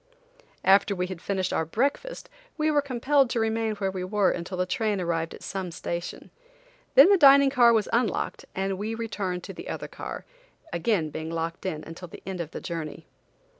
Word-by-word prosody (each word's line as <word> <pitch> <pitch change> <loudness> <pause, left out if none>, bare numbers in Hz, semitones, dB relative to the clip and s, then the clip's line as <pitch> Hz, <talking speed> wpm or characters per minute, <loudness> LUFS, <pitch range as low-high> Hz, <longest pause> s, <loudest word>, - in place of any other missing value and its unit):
After 200 +1 +5
we 180 0 -1
had 180 -2 -7
finished 190 -2 -1
our - - +1
breakfast 280 - -2 0.3
we 310 0 +2
were 295 -1 +3
compelled 275 0 +2
to 235 - -1
remain 225 -1 0
where 195 -2 -1
we 185 -1 -4
were 200 +1 +2
until 180 +2 -5
the 180 - +1
train 210 +1 -1
arrived 165 -2 -2
at - - -14
some 190 -2 -4
station. 170 +1 -5 0.6
Then 290 +9 +9
the 395 - +5
dining 280 -2 +7
car 240 -3 +6
was 220 -3 +2
unlocked 230 -4 0
and 190 0 -1
we 220 +2 -3
returned 200 -6 -3
to - - -7
the - - -8
other - - -4
car, - - -7 0.5
being 175 +6 +1 0.2
again 160 0 -4
locked 165 +2 -3
in 155 -4 -4
until 165 +2 -9
the - - -12
end 185 -2 -4
of 160 - -5
our - - -3
journey. 165 -1 -5
195 Hz, 195 wpm, -26 LUFS, 175-235 Hz, 0.6 s, Then